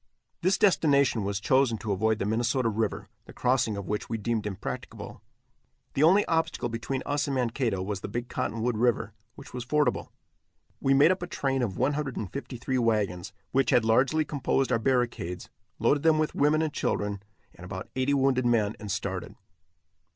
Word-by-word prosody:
This 185 +3 +2
destination 140 - +3
was 100 0 -2
chosen 130 +1 +2
to 110 -1 -4
avoid 110 +3 +1
the 100 - -2
Minnesota 120 +3 +1
river, 110 0 -2 0.2
the - - -13
crossing 125 -4 +1
of 100 - -6
which 105 0 -3
we 115 - -1
deemed 110 0 -2
impracticable. 100 -1 -6 0.7
The 135 - 0
only 185 +7 +5
obstacle 160 -6 0
between 115 +3 -3
us 145 0 0
and 140 - -1
Mankato 120 -5 0
was 100 -1 -4
the - - -4
Big 120 +4 -4
Cottonwood 120 -2 -2
river, 120 0 +1 0.2
which - - -12
was 125 -1 -4
fordable. 145 0 0 0.7
We 135 0 +3
made 145 +5 +6
up 185 - -1
a 175 - -4
train 135 -5 -1
of 105 -7 -2
153 130 -2 -2
wagons, 105 -6 0 0.2
which 135 -1 +2
had 125 -4 +4
largely 135 +7 +3
composed 135 -2 0
our 115 - +2
barricades, 120 -8 -1 0.3
loaded 145 - +2
them 160 0 +4
with 155 0 0
women 150 +2 +3
and 155 -2 -2
children, 100 -1 -2 0.3
and 85 - -14
about 95 +1 -7
eighty 130 +2 +1
wounded 130 -2 +2
men, 110 -3 +2
and 105 -2 -5
started. - - -4
125 Hz, 175 wpm, -27 LUFS, 110-140 Hz, 0.7 s, made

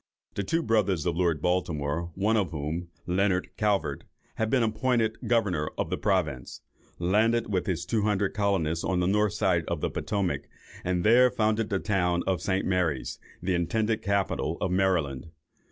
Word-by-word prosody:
The - - -2
two 165 - 0
brothers 100 - +1
of 85 - 0
Lord 85 -4 0
Baltimore, 85 -2 -1
one 105 +4 +1
of 100 -5 +1
whom, 80 +3 -4 0.2
Leonard 95 +1 0
Calvert, 105 -2 0 0.3
had 110 0 0
been 125 0 +3
appointed 110 0 0
governor 100 -10 +1
of - - -2
the - - 0
province, 65 -5 -1 0.4
landed 110 +5 +2
with 90 -2 0
his 90 -2 -1
two 110 +4 0
hundred 100 -2 +1
colonists 95 -6 0
on 90 -1 0
the 90 - +1
north 105 +2 +2
side 95 -5 +1
of 85 - -2
the - - -2
Potomac, 100 -4 -2 0.3
and 90 -1 0
there 125 +4 +6
founded 110 -1 0
the 100 - +1
town 90 -4 0
of 95 -2 0
St. 95 0 0
Mary's, 90 -8 -1 0.2
the 95 +1 0
intended 110 +6 0
capital 100 -1 0
of 90 - -1
Maryland. 90 -8 +1
95 Hz, 170 wpm, -27 LUFS, 85-105 Hz, 0.4 s, there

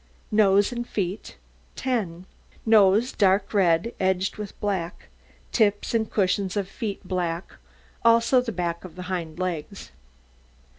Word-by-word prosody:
NOSE 205 -1 +4
AND 240 0 -4
FEET 190 0 -4 0.4
10 195 -9 -2 0.4
Nose 220 +2 +5
dark 195 0 +2
red, 185 +2 +2
edged 190 0 0
with 210 -2 -7
black; 185 -4 -3 0.4
tips 205 -2 +1
and 220 -2 +1
cushions 195 0 0
of 200 -2 -1
feet 200 -2 -5
black, 175 -2 -2 0.5
also 230 +2 +5
the 245 -2 -4
back 170 -3 -3
of 180 -3 -10
the 180 - -7
hind 165 -3 -4
legs. 185 - -4
195 Hz, 130 wpm, -25 LUFS, 180-215 Hz, 0.5 s, Nose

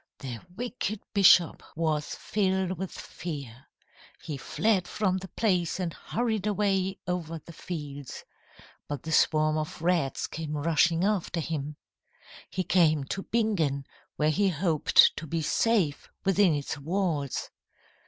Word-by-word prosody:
"The 125 -4 -6 0.2
wicked 230 -2 -3
bishop 185 -4 +6
was 155 -2 -1
filled 190 -3 0
with 190 -1 -3
fear. 140 -7 -7 0.6
He 155 -3 -4
fled 190 +6 0
from 190 -3 0
the 190 0 -7
place 180 -4 0
and 175 -3 -2
hurried 220 -3 -2
away 195 -2 +1
over 170 -2 -2
the 165 +2 -12
fields. 145 -6 -7 0.6
But 145 -3 -5
the 160 - -5
swarm 155 0 +3
of 155 - -5
rats 165 -5 +1
came 155 -1 -4
rushing 165 +3 +2
after 195 -4 0
him. 150 -2 -3 0.7
He 185 - -2
came 160 -6 +3
to 195 - -4
Bingen, 180 -13 0 0.3
where 155 +1 +2
he 200 +4 +2
hoped 165 -2 +4
to 160 - -5
be 165 +2 -2
safe 170 -2 +1 0.2
within 195 -3 +4
its 145 0 -4
walls. 160 -3 -1
170 Hz, 135 wpm, -28 LUFS, 150-190 Hz, 0.7 s, bishop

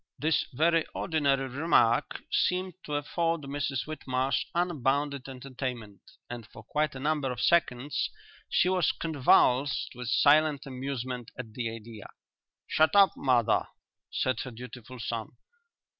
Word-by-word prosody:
This 160 +1 +1
very 165 +4 +3
ordinary 140 -4 +1
remark 130 -4 +2
seemed 185 0 +1
to 150 - -3
afford 165 +3 -1
Mrs 140 -2 -3
Whitmarsh 135 -4 -1
unbounded 145 -5 0
entertainment 125 -6 -6 0.3
and 120 -3 -7
for - - -13
quite 150 -2 -1
a - - -6
number 145 -2 0
of 125 - -5
seconds 140 -4 +1 0.4
she - - +3
was 185 -2 +2
convulsed 140 -3 +2
with 125 -1 -7
silent 145 +3 +4
amusement 130 -2 -5
at 115 -4 -7
the 120 -1 -2
idea. 115 -2 -9 0.6
"Shut 155 +4 +2
up, 200 -1 +7
mother," 120 -4 +2 0.4
said 130 -3 -1
her 130 - -4
dutiful 125 +1 -10
son. 115 -1 -4
135 Hz, 130 wpm, -29 LUFS, 125-155 Hz, 0.6 s, up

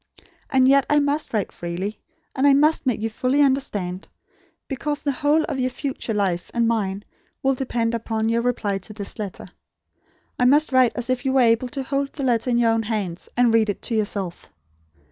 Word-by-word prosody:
And 260 -1 +4
yet, 275 +1 +4
I 295 - +4
must 290 +1 0
write 215 -4 -1
freely; 175 +5 -5 0.4
and 275 +1 +3
I 280 - +6
must 300 +1 +3
make 230 -4 0
you - - +1
fully 255 +5 0
understand; 205 -9 -1 0.6
because 290 +2 -3
the 285 - +1
whole 300 +3 +2
of 265 - -3
your 255 0 +1
future 255 -3 -4
life 185 -4 -1
and 235 -1 +2
mine 205 -3 -1 0.4
will 270 0 +3
depend 240 -3 -1
upon 225 -1 -2
your 230 +1 +1
reply 215 -5 -1
to 195 +3 -9
this 205 +1 -5
letter. 205 -3 -6 0.9
I 250 - +3
must 290 +4 +4
write 255 -2 +4
as 245 0 -2
if 255 0 -1
you 265 -1 0
were 265 - +4
able 230 +1 +3
to 275 0 -4
hold 275 +1 -2
the 280 - -5
letter 240 -1 +1
in 240 - +2
your 235 -1 +3
own 225 0 +1
hands, 205 -6 -4
and 245 -2 +4
read 220 -2 +3
it 205 - -4
to 230 - -2
yourself. 200 -4 -2
240 Hz, 205 wpm, -23 LUFS, 215-270 Hz, 0.9 s, I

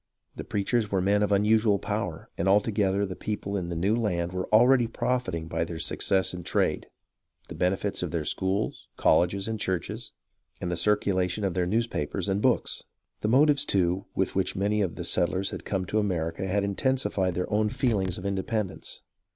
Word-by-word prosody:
The - - -6
preachers 105 +2 -1
were 95 - +2
men 100 +3 +2
of 105 - +1
unusual 105 +1 +4
power, 100 -5 -3
and 85 - -1
all 100 +2 +6
together 100 -2 0
the 95 -2 -6
people 105 -1 -4
in 90 -3 -2
the 85 - -3
new 95 +7 +1
land 90 -7 -1
were 90 0 -4
already 120 +2 +5
profiting 115 -9 -2
by 80 - -1
their 85 0 -5
success 95 +4 +1
in 90 - -5
trade, 85 - 0 0.6
the - - -6
benefits 95 +2 -1
of 90 - -2
their 80 -2 -2
schools, 95 +5 -1
colleges, 95 +3 +2
and 110 -1 -3
churches, 100 +6 -3 0.5
and 90 - -3
the - - 0
circulation 95 0 +1
of 95 -3 0
their 90 -1 0
newspapers 100 -4 -1
and 100 +1 0
books. 125 -1 +1 0.4
The - - -1
motives, 140 +4 +4
too, 95 -6 +1
with - - 0
which - - 0
many 105 +2 +1
of 90 -5 -1
the - - -5
settlers 95 +2 0
had - - -7
come 95 -2 -1
to 110 +4 0
America 90 -2 -1
had 100 +2 +1
intensified 100 -3 0
their 90 +3 -2
own 105 0 +2
feeling 105 -5 0
of 90 +1 -4
inde 100 -1 0
pendence. 110 -4 -3
100 Hz, 190 wpm, -27 LUFS, 90-105 Hz, 0.6 s, all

